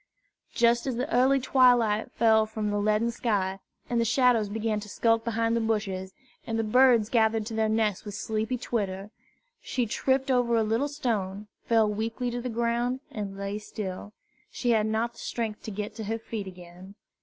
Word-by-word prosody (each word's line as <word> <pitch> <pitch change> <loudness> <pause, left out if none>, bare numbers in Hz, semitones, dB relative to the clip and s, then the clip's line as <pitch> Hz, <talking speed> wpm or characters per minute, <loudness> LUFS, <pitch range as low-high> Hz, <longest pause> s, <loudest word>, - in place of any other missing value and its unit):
Just 235 +2 +3
as 260 - -1
the 250 +4 -2
early 265 +3 +4
twilight 245 -5 +3
fell 220 -1 +4
from 215 -1 -3
the 205 - 0
leaden 215 +3 +1
sky, 195 -5 -1 0.3
and 235 -1 +1
the - - +3
shadows 230 -2 +3
began 215 0 -1
to 210 0 -9
skulk 225 +1 +2
behind 230 0 0
the - - +2
bushes, 200 -4 -2 0.4
and 225 -1 -1
the 225 - +1
birds 235 -1 +4
gathered 220 -2 +2
to 225 - -6
their 220 0 +1
nests 215 -3 0
with 205 -2 -7
sleepy 220 +4 -2
twitter, 200 -4 -3 0.5
she 245 - -1
tripped 265 +4 0
over 245 -2 +2
a 225 - +3
little 225 +6 0
stone, 215 -9 -2 0.2
fell 225 -2 +3
weakly 225 +4 -2
to 245 0 -3
the 250 - -4
ground, 235 +2 0
and 200 -2 -5
lay 200 +1 -4
still. 205 -1 -6 0.4
She 245 - -1
had 220 -2 +2
not 225 +2 -1
the - - -16
strength 225 -3 -4
to - - -4
get 210 +1 -5
to 220 - -5
her 225 +2 -2
feet 220 -3 -6
again. 180 +1 -12
225 Hz, 190 wpm, -27 LUFS, 210-235 Hz, 0.5 s, early